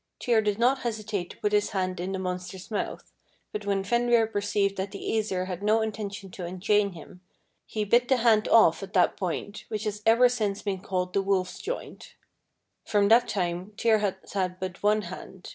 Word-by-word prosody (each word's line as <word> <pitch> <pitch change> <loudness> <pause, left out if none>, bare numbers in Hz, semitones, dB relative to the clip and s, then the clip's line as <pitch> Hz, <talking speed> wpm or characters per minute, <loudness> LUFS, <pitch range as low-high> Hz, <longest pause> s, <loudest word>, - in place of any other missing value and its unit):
Tyr 235 -3 +3
did 210 -1 0
not 250 +4 +3
hesitate 215 -6 -3
to - - -11
put 210 - -1
his 210 0 +2
hand 185 -2 -2
in 180 +2 -3
the 190 - -2
monster's 185 +1 -5
mouth, 210 - -4 0.4
but 210 -1 -5
when 195 -1 +1
Fenrir 235 +2 +3
perceived 205 -2 0
that 190 +1 -2
the 200 0 -8
Æsir 205 -4 0
had 185 -1 -5
no 215 +2 +3
intention 205 -3 -5
to 180 - -7
unchain 195 +3 +1
him, 180 +2 -13 0.5
he 215 -1 -2
bit 240 +4 +3
the 260 - +3
hand 225 -3 +3
off 215 -7 +5
at 195 0 -8
that 180 - +3
point, 200 +2 -4
which 215 -1 -4
has 210 -1 -3
ever 230 +3 +6
since 210 -5 -2
been 195 -3 -2
called 180 -1 -2
the 195 - +2
wolf's 190 -2 -1
joint. 485 +4 -6 0.7
From 205 -1 +2
that 235 +2 +6
time 180 +1 -2
Tyr 225 -2 +3
has 195 -2 -3
had 185 -2 -1
but 185 -1 -5
one 210 +1 +3
hand. 185 +1 -9
205 Hz, 195 wpm, -27 LUFS, 185-220 Hz, 0.7 s, ever